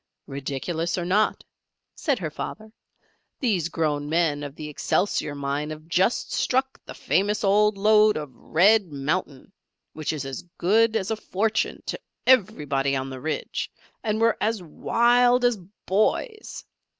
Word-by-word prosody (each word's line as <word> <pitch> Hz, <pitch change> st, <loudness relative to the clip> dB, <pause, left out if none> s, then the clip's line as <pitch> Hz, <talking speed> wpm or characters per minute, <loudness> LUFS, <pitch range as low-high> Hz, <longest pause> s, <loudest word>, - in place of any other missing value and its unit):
"Ridiculous 145 Hz, +6 st, -3 dB
or 175 Hz, -, -2 dB
not," 205 Hz, +4 st, +1 dB, 0.5 s
said 280 Hz, -4 st, 0 dB
her 165 Hz, -7 st, -4 dB
father, 215 Hz, +7 st, -7 dB, 0.7 s
"these 190 Hz, -, 0 dB
grown 150 Hz, -3 st, -1 dB
men 160 Hz, -3 st, +1 dB
of 140 Hz, -1 st, -7 dB
the 155 Hz, -1 st, -7 dB
'Excelsior' 150 Hz, 0 st, -1 dB
mine 140 Hz, +1 st, -2 dB
have 155 Hz, +1 st, -8 dB
just 185 Hz, +7 st, +1 dB
struck 265 Hz, +1 st, 0 dB
the -, -, -8 dB
famous 205 Hz, +4 st, 0 dB
old 210 Hz, +1 st, +3 dB
lode 215 Hz, +1 st, +5 dB
of 145 Hz, -5 st, -7 dB
Red 195 Hz, -, +3 dB
Mountain, 145 Hz, +2 st, -3 dB, 0.4 s
which 155 Hz, -1 st, -3 dB
is 150 Hz, -3 st, -4 dB
as 135 Hz, -1 st, -5 dB, 0.2 s
good 220 Hz, +5 st, +3 dB
as 210 Hz, -1 st, -1 dB
a -, -, +1 dB
fortune 220 Hz, +1 st, -1 dB
to -, -, -4 dB, 0.3 s
everybody 150 Hz, -, +2 dB
on 135 Hz, 0 st, -3 dB
the 130 Hz, -1 st, -7 dB
Ridge, 155 Hz, +2 st, -3 dB, 0.3 s
and 215 Hz, -1 st, 0 dB
were 230 Hz, 0 st, +3 dB
as 220 Hz, -3 st, 0 dB
wild 245 Hz, +8 st, +3 dB
as 245 Hz, -2 st, +3 dB, 0.3 s
boys! 430 Hz, -, -1 dB
185 Hz, 145 wpm, -25 LUFS, 150-220 Hz, 0.7 s, lode